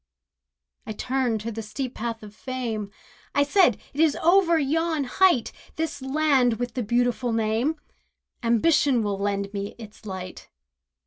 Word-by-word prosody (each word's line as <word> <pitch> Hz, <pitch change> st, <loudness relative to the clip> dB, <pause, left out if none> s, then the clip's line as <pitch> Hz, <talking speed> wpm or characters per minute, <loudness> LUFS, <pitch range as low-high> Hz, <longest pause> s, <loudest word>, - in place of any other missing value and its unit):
I 215 Hz, -, -3 dB
turned 250 Hz, -1 st, -1 dB
to 230 Hz, +2 st, -4 dB
the 225 Hz, 0 st, -5 dB
steep 250 Hz, +4 st, -5 dB
path 230 Hz, -1 st, -4 dB
of 210 Hz, -1 st, -11 dB
fame, 230 Hz, -4 st, -4 dB, 0.5 s
I 285 Hz, -, +5 dB
said, 290 Hz, -, +4 dB
"It 280 Hz, -, -7 dB
is 315 Hz, -2 st, +4 dB
over 340 Hz, 0 st, +4 dB
yon 320 Hz, +1 st, 0 dB
height— 270 Hz, -1 st, +3 dB, 0.2 s
This 320 Hz, -2 st, -3 dB
land 265 Hz, -3 st, +2 dB
with 245 Hz, 0 st, -4 dB
the 255 Hz, -, -2 dB
beautiful 245 Hz, +2 st, 0 dB
name— 225 Hz, +7 st, +1 dB, 0.7 s
Ambition 245 Hz, +1 st, +3 dB
will 200 Hz, -2 st, -2 dB
lend 200 Hz, 0 st, -2 dB
me 200 Hz, 0 st, -4 dB
its 220 Hz, -2 st, -12 dB
light." 185 Hz, -2 st, -7 dB
245 Hz, 145 wpm, -25 LUFS, 215-285 Hz, 0.7 s, I